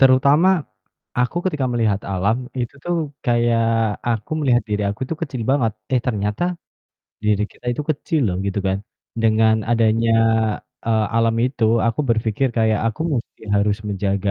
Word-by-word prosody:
terutama 140 +6 +5 0.7
aku 125 +6 0
ketika 150 -7 0
melihat 110 -4 +1
alam 100 +4 +1 0.2
itu 120 0 -3
tuh, 175 0 0 0.3
kayak 120 -1 +2 0.5
aku 110 -3 -2
melihat 125 -4 +3
diri 105 0 -1
aku 100 - -7
tuh 165 - -2
kecil 130 -7 -3
banget, 125 -6 +2 0.2
eh, 125 - +3
ternyata 105 +3 -1 0.8
diri 105 -1 +2
kita - - -16
itu 150 - -3
kecil 155 +1 -1
loh, 90 - -1
gitu 100 +1 -1
kan. 95 0 +1 0.4
Dengan 110 0 +4 0.2
adanya, 115 0 +3 0.7
eee, 110 -2 +2
alam 115 0 +3
itu 130 -3 -1 0.2
aku 115 +4 0
berpikir, 115 +3 +1
kayak 110 -1 +3
aku 110 - -7
musti 115 -2 -5
harus 100 0 +2
menjaga 100 0 -1
115 Hz, 150 wpm, -21 LUFS, 105-125 Hz, 0.8 s, terutama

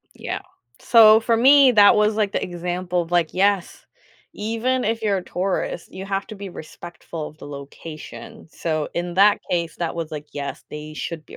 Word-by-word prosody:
Yeah, - - -5 0.4
so 220 -2 +7
for 230 0 +1
me, 270 +2 +6
that 205 -3 +7
was 210 0 +2
like 210 -2 0
the - - -1
example 180 0 -2
of, 165 - -11
like, 175 -2 +1
"Yes," 195 -1 0 0.5
even 230 +4 -1
if 225 +1 -1
you're 200 -3 +1
a - - -6
tourist, 180 -2 -3
you 190 - -7
have 195 0 -3
to - - -8
be 200 -1 -8
respectful 170 -1 -9
of 155 - -19
the - - -10
location, 155 +9 -10
so 155 -3 -2
in 175 0 -3
that 200 +3 +5
case 170 -2 -1
that 170 -2 -3
was, 165 -2 -4
like, 150 -1 -7
"Yes, 140 -1 -6
they 150 0 -8
should 160 0 -6
be - - -12
180 Hz, 190 wpm, -22 LUFS, 165-215 Hz, 0.5 s, so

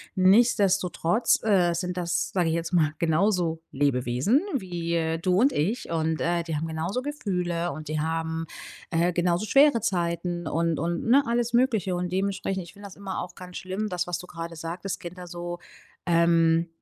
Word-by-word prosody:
Nichtsdestotrotz, 195 -1 +3
äh, 185 -5 +3
sind 180 +1 -3
das, 175 -1 -1
sage 175 -3 +2
ich - - 0
jetzt 170 +2 -3
mal, 155 -4 +3
genauso 170 0 +1
Lebewesen 135 - +1
wie 170 - -1
du 185 +1 +2
und 270 +4 +4
ich. 200 - -1
Und, 160 -1 0
äh, 170 0 0
die 165 -1 -3
haben 160 +2 -3
genauso 165 +9 -2
Gefühle. 180 - -2
Und 155 +2 -8
die 155 0 -1
haben, 160 0 -2 0.4
äh, 175 +1 +1
genauso 175 +3 +1
schwere 275 +1 +5
Zeiten 175 -3 -1
und 165 +1 0
und 170 +3 -2
ne, 275 +4 +6
alles 235 0 0
Mögliche. 225 -7 +2
Und 175 0 -3
dementsprechend, 190 0 -1
ich 170 - -13
finde 200 0 -10
das 190 - -13
immer 195 -1 -4
auch 180 - -9
ganz 180 -1 -11
schlimm, 190 +3 -3
das, 180 -3 -2
was 175 -1 -3
du 180 - -10
gerade 165 -1 -7
sagtest, 175 +4 -5
Kinder 180 +1 -8
so, 175 0 -6 0.5
ähm 165 -1 +3
175 Hz, 175 wpm, -26 LUFS, 165-195 Hz, 0.5 s, ne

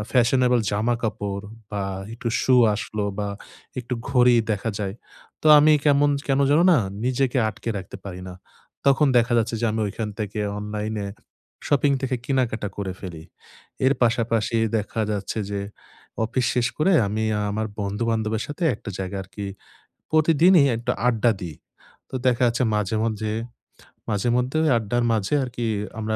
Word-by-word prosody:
আ - - -2
fashionable 125 0 +3
জামাকাপড় 105 -2 -2 0.3
বা 100 -1 -2 0.3
একটু 115 +1 -4
শু 130 - +4 0.2
আসলো 105 0 -3
বা 100 - -1 0.5
একটু 125 0 -3 0.2
ঘড়ি 125 -1 +5 0.2
দেখা 105 +2 -2
যায়। 100 -2 -3 0.5
তো - - 0
আমি 155 +1 +6
কেমন 145 0 +4 0.2
কেন 135 0 +2
যেন 150 +3 +5
না 160 - +5 0.3
নিজেকে 130 +1 +1
আটকে 115 - -7
রাখতে 95 +1 -8
পারি 90 -2 -7
না। 90 - -8 0.5
তখন 140 +2 +5
দেখা 120 +1 +1
যাচ্ছে 115 0 0
যে - - 0
আমি 110 - -1
ঐখান 110 +2 -4
থেকে 105 0 -3 0.2
অনলাইনে 105 0 -3 0.6
শপিং 145 0 +3
থেকে 130 -1 0
কেনাকাটা 120 -6 0
করে 95 -2 -3
ফেলি। 85 -4 -8 0.6
এর 135 - +5
পাশাপাশি 115 -1 +1 0.2
দেখা 105 +2 -4
যাচ্ছে 100 +1 -3
যে 100 -1 -2 0.6
অফিস 125 +2 0
শেষ 120 -1 +2
করে 185 +5 +3
আমি 110 +2 -1 0.3
আমার 110 +2 -2
বন্ধু-বান্ধবের 110 +2 -1
সাথে 150 +4 -4
একটা 105 - -8
জায়গা 95 +1 -4
আরকি 100 +2 -7 0.6
প্রতিদিনই 160 +2 +5
একটু 115 - -1
আড্ডা 120 -1 +3
দিই। 85 -4 -6 0.5
তো - - -10
দেখা 125 0 +2
যাচ্ছে 120 +1 +1
মাঝে, 105 +1 0
মাঝে 110 -1 -2 0.8
মাঝেমধ্যে 125 +6 0
ওই - - +3
আড্ডার 115 +2 -1
মাঝে 105 +3 -1
আরকি 120 -2 -3 0.3
আমরা 110 0 -1
115 Hz, 150 wpm, -23 LUFS, 105-125 Hz, 0.8 s, আমি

